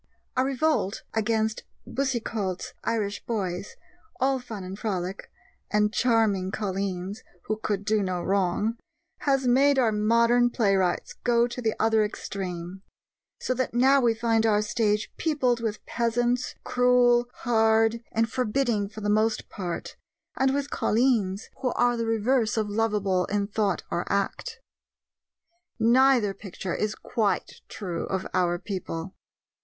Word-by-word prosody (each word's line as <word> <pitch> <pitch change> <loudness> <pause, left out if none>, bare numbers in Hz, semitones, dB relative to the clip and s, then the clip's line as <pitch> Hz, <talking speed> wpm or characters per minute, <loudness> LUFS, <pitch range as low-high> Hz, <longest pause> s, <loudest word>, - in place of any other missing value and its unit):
A 255 - +3
revolt 270 -6 0
against 220 0 0 0.2
Boucicault's 225 -8 -2
Irish 210 -3 -2
boys, 195 -4 -3 0.4
all 265 0 +2
fun 220 -6 -7
and 190 +2 -7
frolic, 190 -3 -3 0.4
and 210 0 +2
charming 220 -7 +2
colleens, 195 -1 -3 0.2
who 215 - -2
could 205 -2 -2
do 215 0 +2
no 185 -2 -1
wrong, 200 +4 0 0.4
has 270 -2 +1
made 275 +3 +4
our 240 -4 +3
modern 235 +3 +3
playwrights 195 -6 +1
go 235 -1 +3
to 245 +1 -5
the 220 -2 0
other 220 -1 +3
extreme; 185 -3 -5 0.6
so 255 - -1
that 255 -2 -2
now 270 +3 +5
we 235 -2 +3
find 225 -1 +1
our 210 -1 +3
stage 210 -1 0
peopled 260 -7 +1
with 220 -2 -4
peasants, 240 +1 0
cruel, 245 -1 +4 0.2
hard, 225 -1 +3
and 225 +1 +1
forbidding 235 -4 0
for 215 0 -9
the 205 - -2
most 215 +1 +1
part, 180 -4 -5 0.4
and 265 0 +2
with 280 +1 -2
colleens 220 -5 +1
who 255 -3 +1
are 245 0 +2
the 230 -1 -2
reverse 225 +1 +1
of 215 -1 +1
lovable 205 -4 +1
in 205 0 0
thought 200 -2 -1
or 175 - -2
act. 455 - -2 1.2
Neither 240 -2 +4
picture 195 -2 -6
is 215 0 -1
quite 205 -5 -2
true 180 -5 -4
of 190 0 -2
our 175 -1 +2
people. 185 -2 -5
220 Hz, 135 wpm, -26 LUFS, 200-240 Hz, 1.2 s, now